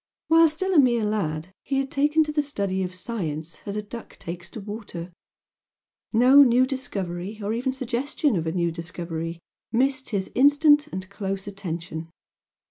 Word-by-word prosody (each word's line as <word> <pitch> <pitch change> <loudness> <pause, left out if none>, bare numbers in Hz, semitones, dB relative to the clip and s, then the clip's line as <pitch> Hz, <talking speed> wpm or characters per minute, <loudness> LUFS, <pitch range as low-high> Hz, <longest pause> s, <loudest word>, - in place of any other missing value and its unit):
While 325 0 +7
still 375 +5 -2
a 325 - +7
mere 240 -5 +4
lad 185 -5 -2
he 275 - -2
had 270 0 -1
taken 295 +3 +3
to 305 - -3
the 300 0 +2
study 200 -10 -2
of 185 0 -3
science 170 -6 -4
as 200 - -3
a 210 - -2
duck 230 +3 -9
takes 175 +1 -7
to - - -8
water, 200 -4 -7 1.0
no 255 +5 +7
new 255 -1 +6
discovery 200 -7 -4
or 205 +1 -2
even 250 +3 0
suggestion 265 +1 -1
of 165 -2 -1
a - - +1
new 170 -1 0
discovery 165 0 -5 0.3
missed 260 +2 +1
his 200 -4 -2
instant 290 +2 +5
and 190 -9 -6
close 195 -1 -3
attention. 170 -5 -5
210 Hz, 165 wpm, -25 LUFS, 180-270 Hz, 1.0 s, While